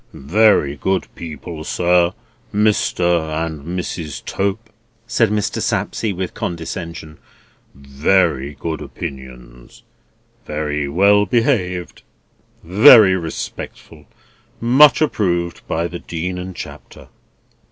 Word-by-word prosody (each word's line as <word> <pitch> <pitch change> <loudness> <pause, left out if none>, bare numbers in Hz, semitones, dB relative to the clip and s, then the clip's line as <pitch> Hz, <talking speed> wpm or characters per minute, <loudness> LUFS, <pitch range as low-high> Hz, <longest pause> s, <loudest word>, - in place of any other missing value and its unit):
"Very 80 -1 +3
good 95 +5 -1
people, 80 0 -8
sir, 90 +1 +2 0.4
Mr. 85 -6 +1
and 80 -3 -7
Mrs. 80 -3 -5
Tope," 100 +3 -3 0.3
said 115 -1 +2
Mr. 105 -1 -1
Sapsea, 105 -4 -1
with 90 0 -4
condescension. 85 -2 -6 0.6
"Very 70 +1 0
good 80 +1 -5
opinions. 60 -3 -10 0.6
Very 75 -1 -3
well 100 +6 +3
behaved. 100 -8 0 0.6
Very 105 - +7
respectful. 85 -3 -7 0.5
Much 130 +5 +5
approved 85 - -1
by 85 +1 -1
the 85 0 -7
Dean 90 +2 -4
and 90 0 -7
Chapter." - - -10
85 Hz, 95 wpm, -19 LUFS, 80-100 Hz, 0.6 s, Very